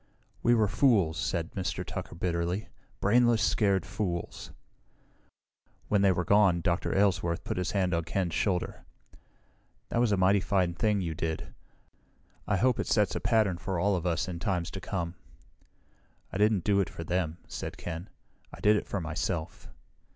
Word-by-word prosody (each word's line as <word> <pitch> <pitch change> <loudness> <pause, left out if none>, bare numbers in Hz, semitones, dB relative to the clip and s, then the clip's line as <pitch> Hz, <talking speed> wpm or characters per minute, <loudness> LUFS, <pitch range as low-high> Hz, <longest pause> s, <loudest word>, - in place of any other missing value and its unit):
"We 120 0 +4
were 110 -2 +3
fools," 100 - +3
said 85 -3 -2
Mr. 95 -2 -3
Tucker - - -6
bitterly. 85 +3 -2 0.3
"Brainless, 120 +1 +4
scared 100 -5 +2
fools." 90 -2 -4 1.4
When 105 -2 +3
they 100 -1 +5
were 90 -1 -1
gone, 100 -4 +4
Dr. 85 +3 0
Aylesworth 90 -4 +1
put - - -3
his 90 0 -1
hand 95 -3 +1
on 85 -1 0
Ken's 85 -1 -1
shoulder. 90 -1 -1 1.1
"That - - 0
was 120 -3 +3
a 100 - +3
mighty 95 +2 +4
fine 90 -2 +1
thing 105 +4 +1
you 85 -3 -2
did. 80 0 -4 0.9
I 100 - +2
hope 125 +3 +2
it - - -1
sets 105 -3 +2
a - - -1
pattern 105 -6 +2
for 95 -2 -2
all 100 +2 +2
of 90 0 -2
us 85 -1 0
in 85 -2 -5
times 90 -3 -1
to 95 - -6
come." 85 -4 -3 1.2
"I 95 - -3
didn't 105 -3 +3
do 100 -1 +3
it 100 - +1
for 85 - -7
them," 85 -1 -1
said - - -6
Ken. 85 +2 -6 0.4
"I - - -11
did 105 +1 +4
it - - -4
for 100 - -2
myself." 80 0 -4
95 Hz, 170 wpm, -29 LUFS, 85-105 Hz, 1.4 s, they